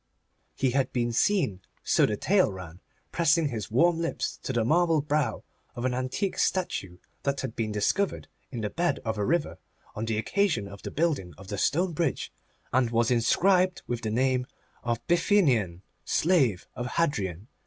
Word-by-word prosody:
He 130 -2 +1
had 135 +1 +1
been 120 -1 0
seen, 130 - +1 0.2
so - - +3
the 105 - -2
tale 190 - +3
ran, 90 -2 -9 0.3
pressing 165 -2 +3
his 110 -5 -4
warm 165 +9 +3
lips 165 0 -2
to - - -3
the 120 -3 +1
marble 165 +3 +3
brow 150 0 -1 0.3
of 120 - -4
an 130 - +1
antique 130 +10 -2
statue 100 - -1 0.2
that 140 -1 -1
had 130 -4 -5
been 110 -2 -2
discovered 135 - 0 0.2
in 120 -4 -5
the 105 - -2
bed 175 +1 0
of 110 -1 -1
the 105 - 0
river 165 +4 0 0.3
on 110 - -3
the 115 -1 -1
occasion 160 - 0
of 100 0 -11
the - - -5
building 140 - -1
of 95 0 -12
the 100 - -3
stone 175 +3 +1
bridge, 160 -3 -1 0.4
and 125 -2 +3
was 115 +1 +2
inscribed 180 +10 +3
with 120 -1 -3
the 110 - -2
name 125 +2 +1 0.4
of 120 -1 0
the 120 - -35
Bithynian 135 - +2 0.2
slave 140 - +2
of 120 - -3
Hadrian. 105 - -1
130 Hz, 175 wpm, -27 LUFS, 110-165 Hz, 0.4 s, so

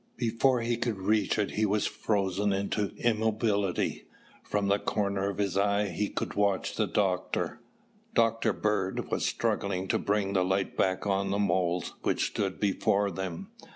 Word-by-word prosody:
Before 120 +1 +2
he 115 0 0
could 115 -3 -1
reach 105 +1 +1
it 105 -2 0
he 110 - 0
was 105 0 +2
frozen 100 -1 0
into 100 +1 -1
immobility. 110 -4 0 0.3
From 100 -1 -1
the 100 +1 +3
corner 100 -2 -1
of 100 - -5
his 100 -3 0
eye 100 +1 +2
he 100 +4 -2
could - - -3
watch 100 -2 +1
the - - +1
doctor. - - -1 0.6
Dr. 115 -1 +3
Bird 100 -2 -1
was - - 0
struggling 95 -1 -1
to - - +2
bring 100 -1 0
the 95 -2 +3
light 95 +1 0
back 95 +1 +1
on 100 -1 +1
the 100 - 0
moles 90 -3 0
which - - +1
stood 95 -2 -2
before 100 0 +1
them. 90 -2 -5
100 Hz, 160 wpm, -29 LUFS, 95-105 Hz, 0.6 s, the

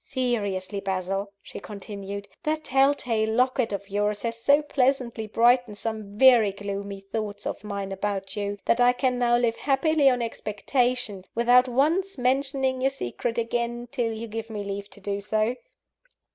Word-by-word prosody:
Seriously, 205 -7 -2
Basil," 195 +1 -2
she - - -8
continued, 200 -1 -7
"that 310 -1 -1
telltale 260 -5 +2
locket 250 0 +1
of 200 0 -4
yours 205 +1 -1
has 230 -1 -2
so 285 +4 +4
pleasantly 255 -5 0
brightened 235 0 +3
some 215 -2 -5
very 240 -5 +6
gloomy 200 0 -5
thoughts 205 -2 -4
of - - -4
mine 200 -2 -4
about 195 0 -3
you, 205 -1 -3
that 240 - +3
I 245 0 +6
can 250 -1 0
now 240 -1 +4
live 235 -1 +1
happily 285 +1 +3
on 250 -2 +1
expectation, 230 -1 -1
without 245 +2 +5
once 315 +10 +1
mentioning 265 0 0
your 265 - +3
secret 235 - -4
again, 235 +1 -2
till 240 -5 -1
you 225 +1 -5
give 225 +1 -5
me 210 -2 -4
leave 200 0 -5
to 205 - -12
do 200 0 -3
so." 215 +3 0
230 Hz, 160 wpm, -26 LUFS, 205-255 Hz, -, very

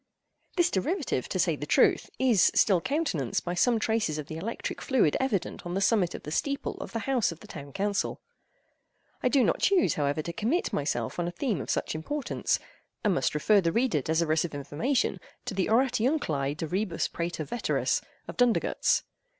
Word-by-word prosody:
This 345 -2 +3
derivative, 305 - -1
to - - -2
say - - +2
the - - -6
truth, - - +3
is 245 -8 +4
still 190 -5 +4
countenanced 260 - -1
by 175 - -1
some 230 +7 +3
traces 220 -8 0
of 150 - -4
the 155 - -7
electric 215 +8 -4
fluid 245 - +2
evident 225 -9 -1
on 175 +1 -4
the - - +1
summit 195 -3 +2
of - - -8
the 150 - -6
steeple 280 - -1
of - - -7
the 230 -1 -4
House 255 -8 +2
of 165 - -10
the - - -13
Town 140 0 -9
Council. 200 +5 -1 1.0
I 250 - +2
do 270 -1 +4
not - - +1
choose, 390 -4 +3
however, 145 +1 -1
to 170 - -5
commit 230 - 0
myself 140 -2 -1
on 175 - 0
a - - -2
theme 195 - -1
of - - -7
such - - -1
importance, 270 - -1 0.5
and 210 -3 +3
must 175 - 0
refer 200 +7 +4
the 165 -2 +1
reader 230 - +1
desirous 160 +2 +1
of 165 -4 -5
information 145 - -1 0.3
to 250 - -3
the 190 -1 0
"Oratiunculae 225 - +1
de 160 - -3
Rebus 185 +1 -1
Praeter 170 -1 -3
Veteris," 235 - 0 0.3
of - - -7
Dundergutz. 245 -2 +2
195 Hz, 190 wpm, -28 LUFS, 160-250 Hz, 1.0 s, is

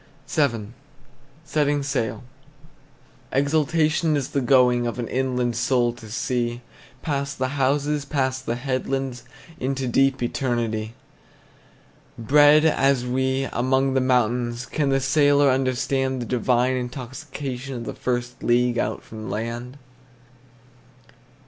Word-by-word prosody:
VII. 115 -8 0 0.8
SETTING 145 -2 +1
SAIL. 135 -4 -2 1.1
Exultation 155 +2 +2
is 135 -2 -3
the 140 - -1
going 125 -2 +4
Of 120 - -4
an 120 -2 -3
inland 125 -2 -1
soul 120 0 +1
to 115 -2 -12
sea, 120 +1 -2 0.4
Past 140 -2 -2
the 130 0 -1
houses, 145 +1 0
past 130 -2 -2
the 115 - 0
headlands, 130 0 -3 0.4
Into 135 0 -2
deep 135 +1 +2
eternity! 115 -3 -2 1.2
Bred 145 +6 +5
as 135 -5 +2
we, 130 +2 0
among 130 +2 +1
the 130 - +2
mountains, 120 -1 +1
Can 140 +3 -1
the 135 0 +2
sailor 145 +1 +4
understand 130 0 0
The 120 - -4
divine 125 +1 +1
intoxication 130 +1 -6
Of 120 -1 -6
the - - -5
first 120 -1 -3
league 120 0 +2
out 110 - -2
from 110 -1 -8
land? 120 +4 -4
130 Hz, 115 wpm, -23 LUFS, 120-140 Hz, 1.2 s, Bred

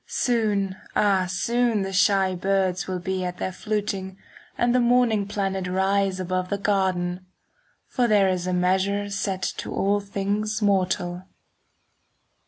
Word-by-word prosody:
Soon, 210 -6 0 0.2
ah, 195 -3 +3
soon 235 +2 +1
the 195 0 -4
shy 190 0 +3
birds 185 -1 0
Will 185 -1 -2
be 185 +1 -3
at 180 0 -4
their 185 - -3
fluting, 200 -2 -3 0.4
And 240 0 +2
the 250 - +4
morning 240 -4 +3
planet 195 -2 -2
Rise 190 +1 +1
above 185 0 -2
the 200 - -1
garden; 190 -3 0
10 185 - -23 0.6
For 245 -2 0
there 205 -3 +4
is 185 -1 -1
a - - 0
measure 190 +3 +1
Set 195 -1 -2
to - - -5
all 200 +1 +1
things 205 +2 -2
mortal. 185 -3 0
195 Hz, 145 wpm, -24 LUFS, 185-205 Hz, 0.6 s, the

